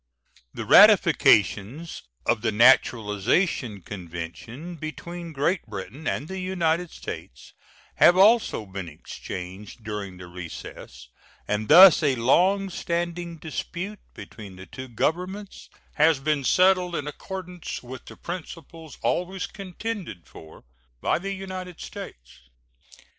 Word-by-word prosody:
The -, -, -6 dB
ratifications 140 Hz, +12 st, +5 dB, 0.2 s
of 120 Hz, -2 st, +1 dB
the 115 Hz, -1 st, 0 dB
naturalization 115 Hz, -, +3 dB
convention 95 Hz, -, -8 dB
between 170 Hz, +2 st, -7 dB
Great 155 Hz, +5 st, 0 dB
Britain 110 Hz, -, -7 dB
and 145 Hz, -, -2 dB
the 190 Hz, +1 st, -5 dB
United 180 Hz, -2 st, 0 dB
States 65 Hz, -, -9 dB, 0.4 s
have 175 Hz, -, +6 dB
also 210 Hz, -, +4 dB
been 95 Hz, -3 st, -7 dB
exchanged 95 Hz, +7 st, -9 dB
during 105 Hz, -3 st, -5 dB
the 90 Hz, -, -10 dB
recess, 80 Hz, -7 st, -10 dB, 0.4 s
and 105 Hz, +1 st, -1 dB
thus 180 Hz, +2 st, +9 dB
a 140 Hz, -4 st, +2 dB
long 185 Hz, +11 st, +2 dB
standing 170 Hz, 0 st, -3 dB
dispute 175 Hz, +6 st, -6 dB, 0.2 s
between 100 Hz, -4 st, -10 dB
the 95 Hz, +1 st, -11 dB
two 130 Hz, +4 st, -9 dB
Governments 180 Hz, -, -3 dB, 0.2 s
has 155 Hz, -1 st, +4 dB
been 150 Hz, 0 st, 0 dB
settled 180 Hz, +3 st, +3 dB
in 145 Hz, -, -3 dB
accordance 180 Hz, +2 st, -7 dB
with 130 Hz, +1 st, -9 dB
the -, -, -12 dB
principles 165 Hz, -3 st, -8 dB
always 180 Hz, +2 st, -1 dB
contended 195 Hz, -, -6 dB
for 80 Hz, +2 st, -14 dB, 0.4 s
by -, -, +1 dB
the 195 Hz, +2 st, -4 dB
United 185 Hz, -2 st, -7 dB
States. -, -, -10 dB
155 Hz, 115 wpm, -25 LUFS, -, 0.4 s, thus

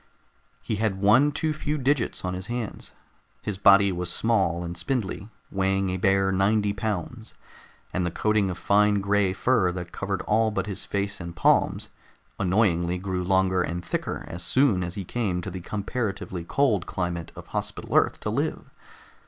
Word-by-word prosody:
He 110 Hz, -, -2 dB
had 105 Hz, -3 st, 0 dB
one 115 Hz, +9 st, +5 dB
too 155 Hz, +2 st, -1 dB
few 150 Hz, 0 st, -2 dB
digits 135 Hz, -7 st, 0 dB
on 90 Hz, -, -2 dB
his 95 Hz, +2 st, -5 dB
hands; 120 Hz, -3 st, -5 dB, 0.5 s
his 100 Hz, -3 st, -4 dB
body 100 Hz, 0 st, +6 dB
was 90 Hz, -1 st, -2 dB
small 95 Hz, -6 st, +1 dB
and 85 Hz, 0 st, -5 dB
spindly, 100 Hz, +2 st, -3 dB, 0.2 s
weighing 95 Hz, 0 st, +1 dB
a 95 Hz, -, -1 dB
bare 95 Hz, +1 st, +2 dB
ninety 100 Hz, +2 st, +2 dB
pounds, 110 Hz, +2 st, -4 dB, 0.6 s
and 90 Hz, -, 0 dB
the 85 Hz, -, 0 dB
coating 105 Hz, +2 st, +1 dB
of 90 Hz, -, -4 dB
fine 105 Hz, +1 st, +3 dB
gray 100 Hz, -1 st, +2 dB
fur 95 Hz, -2 st, +2 dB
that 90 Hz, -1 st, -6 dB
covered 100 Hz, -1 st, -3 dB
all 110 Hz, +1 st, +2 dB
but 95 Hz, -3 st, -2 dB
his 100 Hz, -2 st, -4 dB
face 100 Hz, -1 st, -2 dB
and 85 Hz, 0 st, -7 dB
palms 85 Hz, -, +2 dB, 0.5 s
annoyingly 90 Hz, -3 st, +2 dB
grew 90 Hz, -1 st, -3 dB
longer 95 Hz, 0 st, +2 dB
and 85 Hz, 0 st, -3 dB
thicker -, -, -3 dB
as 85 Hz, +1 st, -7 dB
soon 100 Hz, +1 st, +2 dB
as 85 Hz, 0 st, -4 dB
he 100 Hz, -, -5 dB
came 100 Hz, -4 st, -1 dB
to 90 Hz, +2 st, -5 dB
the 90 Hz, 0 st, -6 dB
comparatively 100 Hz, -2 st, -3 dB
cold 110 Hz, -2 st, +1 dB
climate 85 Hz, -3 st, -3 dB
of -, -, -11 dB
Hospital -, -, -3 dB
Earth -, -, +3 dB
to -, -, -2 dB
live. -, -, -2 dB
95 Hz, 170 wpm, -26 LUFS, 90-110 Hz, 0.6 s, body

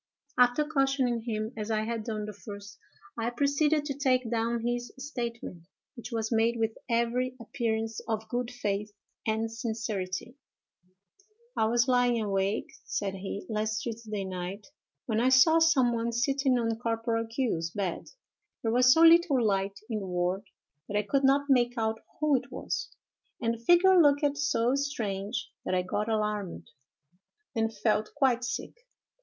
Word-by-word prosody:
"After 250 Hz, +4 st, +4 dB
cautioning 270 Hz, -6 st, +1 dB
him, 215 Hz, 0 st, -2 dB
as 215 Hz, 0 st, -5 dB
I 215 Hz, -1 st, +1 dB
had 225 Hz, 0 st, -3 dB
done 215 Hz, -2 st, -3 dB
the 210 Hz, -, -6 dB
first, 200 Hz, -1 st, -10 dB, 0.4 s
I 230 Hz, +1 st, 0 dB
proceeded 290 Hz, +4 st, +1 dB
to 285 Hz, -, -2 dB
take 255 Hz, -4 st, +1 dB
down 230 Hz, 0 st, 0 dB
his 240 Hz, 0 st, -2 dB
statement, 235 Hz, -, -6 dB, 0.3 s
which 240 Hz, -3 st, -9 dB
was 225 Hz, -1 st, -2 dB
made 230 Hz, +1 st, +2 dB
with 225 Hz, -1 st, 0 dB
every 240 Hz, +2 st, 0 dB
appearance 225 Hz, -1 st, -2 dB
of 220 Hz, -1 st, -2 dB
good 245 Hz, +1 st, -2 dB
faith 210 Hz, -4 st, -3 dB, 0.4 s
and 220 Hz, +1 st, 0 dB
sincerity:— 220 Hz, -1 st, -4 dB, 1.2 s
"'I -, -, +2 dB
was 235 Hz, +3 st, +2 dB
lying 245 Hz, -2 st, +3 dB
awake,' 200 Hz, -1 st, -1 dB
said 195 Hz, -1 st, -2 dB
he, 195 Hz, +1 st, -6 dB
'last 215 Hz, -1 st, -1 dB
Tuesday 220 Hz, -4 st, -4 dB
night, 185 Hz, +2 st, -5 dB, 0.4 s
when 220 Hz, -2 st, 0 dB
I 250 Hz, +2 st, +3 dB
saw 290 Hz, +6 st, +6 dB
some 275 Hz, -7 st, +4 dB
one 230 Hz, 0 st, -1 dB
sitting 265 Hz, +2 st, +1 dB
on 230 Hz, -1 st, -1 dB
Corporal 230 Hz, -1 st, -1 dB
Q——'s 225 Hz, -9 st, -1 dB
bed. 185 Hz, -1 st, -4 dB, 0.5 s
There 225 Hz, -, +1 dB
was 250 Hz, +2 st, +5 dB
so 320 Hz, -, +5 dB
little 330 Hz, -7 st, +6 dB
light 195 Hz, -1 st, 0 dB
in 220 Hz, -3 st, -2 dB
the 195 Hz, -, -6 dB
ward, 180 Hz, +2 st, -1 dB, 0.4 s
that 205 Hz, -, 0 dB
I 210 Hz, -, +1 dB
could 275 Hz, +7 st, 0 dB
not 275 Hz, +1 st, +4 dB
make 245 Hz, -2 st, +3 dB
out 220 Hz, 0 st, 0 dB, 0.2 s
who 305 Hz, -2 st, +3 dB
it -, -, -7 dB
was, -, -, -4 dB, 0.5 s
and 230 Hz, -1 st, 0 dB
the 230 Hz, 0 st, -9 dB
figure 350 Hz, +5 st, +6 dB
looked 285 Hz, -1 st, +3 dB
so 255 Hz, -4 st, +2 dB
strange 220 Hz, -7 st, -2 dB
that 185 Hz, -, -1 dB
I 180 Hz, -, +1 dB
got 210 Hz, +4 st, -2 dB
alarmed, 210 Hz, -4 st, -2 dB, 0.8 s
and 225 Hz, 0 st, +1 dB
felt 215 Hz, 0 st, 0 dB
quite 260 Hz, -4 st, +2 dB
sick. 240 Hz, -, -4 dB
230 Hz, 160 wpm, -29 LUFS, 215-255 Hz, 1.2 s, saw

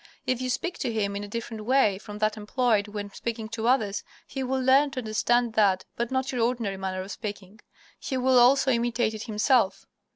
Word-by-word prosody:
If 255 Hz, -1 st, 0 dB
you 255 Hz, -, -2 dB
speak 345 Hz, +8 st, -2 dB
to 240 Hz, -, -1 dB
him 200 Hz, -3 st, -1 dB
in 200 Hz, -, -4 dB
a -, -, -6 dB
different 225 Hz, 0 st, -5 dB
way 215 Hz, -5 st, +3 dB
from 210 Hz, 0 st, -9 dB
that 215 Hz, 0 st, +1 dB
employed 215 Hz, -1 st, +1 dB
when 205 Hz, -1 st, -6 dB
speaking 225 Hz, +1 st, -4 dB
to 225 Hz, 0 st, -3 dB
others 215 Hz, -6 st, +1 dB, 0.2 s
he 270 Hz, -, -5 dB
will 265 Hz, 0 st, -1 dB
learn 265 Hz, +3 st, +4 dB
to 265 Hz, -, -5 dB
understand 235 Hz, +1 st, +1 dB
that, 195 Hz, -4 st, +3 dB
but 235 Hz, 0 st, -2 dB
not 260 Hz, 0 st, -1 dB
your 250 Hz, -3 st, -1 dB
ordinary 230 Hz, -5 st, -1 dB
manner 190 Hz, -1 st, -3 dB
of 195 Hz, -, -9 dB
speaking. 205 Hz, -1 st, -7 dB, 0.4 s
He 265 Hz, -, -3 dB
will 255 Hz, 0 st, +4 dB
also 265 Hz, +2 st, +5 dB
imitate 235 Hz, -1 st, 0 dB
it 215 Hz, 0 st, -6 dB
himself. 225 Hz, -1 st, +1 dB
230 Hz, 205 wpm, -26 LUFS, 210-255 Hz, 0.4 s, also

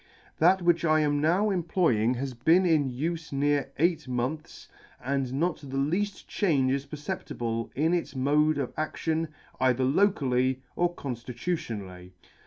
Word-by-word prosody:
That 180 Hz, +3 st, +4 dB
which 170 Hz, -1 st, +3 dB
I 155 Hz, -1 st, +3 dB
am 145 Hz, -1 st, +1 dB
now 185 Hz, +7 st, +2 dB
employing 160 Hz, -, +1 dB
has 130 Hz, +1 st, -4 dB
been 165 Hz, +10 st, +3 dB
in 155 Hz, -5 st, +3 dB
ufe 160 Hz, +6 st, -3 dB
near 140 Hz, 0 st, 0 dB
eight 165 Hz, -1 st, +1 dB
months, 130 Hz, +5 st, -4 dB, 0.3 s
and 135 Hz, 0 st, -2 dB
not 165 Hz, +5 st, 0 dB
the 135 Hz, -2 st, -6 dB
lead; 175 Hz, +9 st, +1 dB, 0.2 s
change 140 Hz, -10 st, +1 dB
is 140 Hz, +1 st, -2 dB
perceptible 120 Hz, -8 st, -4 dB
in 160 Hz, +5 st, +2 dB
its 175 Hz, -4 st, -2 dB
mode 150 Hz, +3 st, +2 dB
of 135 Hz, -3 st, -3 dB
adion 160 Hz, +1 st, -2 dB, 0.3 s
either 130 Hz, 0 st, +2 dB
locally 130 Hz, -5 st, +2 dB
or 175 Hz, 0 st, 0 dB
conftitutionally. 115 Hz, -, -5 dB
145 Hz, 140 wpm, -27 LUFS, 130-170 Hz, 0.3 s, That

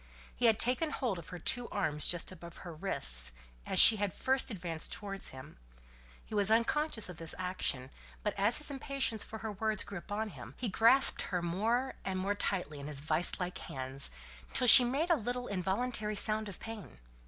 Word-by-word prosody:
He 245 Hz, -, +2 dB
had 220 Hz, -2 st, +4 dB
taken 255 Hz, +6 st, +2 dB
hold 240 Hz, -10 st, -3 dB
of 165 Hz, -, -12 dB
her 180 Hz, -, -7 dB
two 240 Hz, +7 st, -1 dB
arms 150 Hz, -1 st, 0 dB
just 175 Hz, +1 st, 0 dB
above 170 Hz, -2 st, -12 dB
her 175 Hz, -, -7 dB
wrists, 65 Hz, -, +2 dB, 0.4 s
as -, -, +2 dB
she 220 Hz, -, +10 dB
had 205 Hz, 0 st, -1 dB, 0.2 s
advanced 185 Hz, -11 st, 0 dB
towards 195 Hz, -2 st, -6 dB
him; 130 Hz, +3 st, -12 dB, 0.7 s
he -, -, -12 dB
was 205 Hz, -1 st, +1 dB
unconscious 230 Hz, +3 st, +1 dB
of 180 Hz, -3 st, -10 dB
this 165 Hz, -1 st, -4 dB
action; 180 Hz, -8 st, -3 dB, 0.3 s
but, -, -, -1 dB
as 205 Hz, +4 st, +3 dB
his 300 Hz, -1 st, 0 dB
impatience 270 Hz, -5 st, -2 dB
for 220 Hz, -, -9 dB
her 220 Hz, 0 st, -6 dB
words 215 Hz, +1 st, -2 dB
grew 200 Hz, -2 st, -7 dB
upon 210 Hz, +4 st, -5 dB
him, -, -, -12 dB
he 245 Hz, -, -3 dB
grasped 230 Hz, +7 st, +4 dB
her 180 Hz, -2 st, -2 dB
more 225 Hz, +9 st, -1 dB
and 190 Hz, -1 st, -3 dB
more 195 Hz, +2 st, -1 dB
tightly 180 Hz, -7 st, -2 dB
in 140 Hz, -, -8 dB
his 150 Hz, -2 st, -4 dB
vice 155 Hz, +6 st, 0 dB
like 180 Hz, 0 st, -4 dB
hands, 135 Hz, +1 st, -5 dB, 0.4 s
till 255 Hz, -, +3 dB
she 250 Hz, +1 st, +12 dB
made 280 Hz, +8 st, -1 dB
a -, -, +5 dB
little 245 Hz, -1 st, -4 dB
involuntary 210 Hz, +3 st, -2 dB
sound 215 Hz, +1 st, -1 dB
of 195 Hz, -, -10 dB
pain. 220 Hz, -, -9 dB
205 Hz, 190 wpm, -32 LUFS, 175-235 Hz, 0.7 s, she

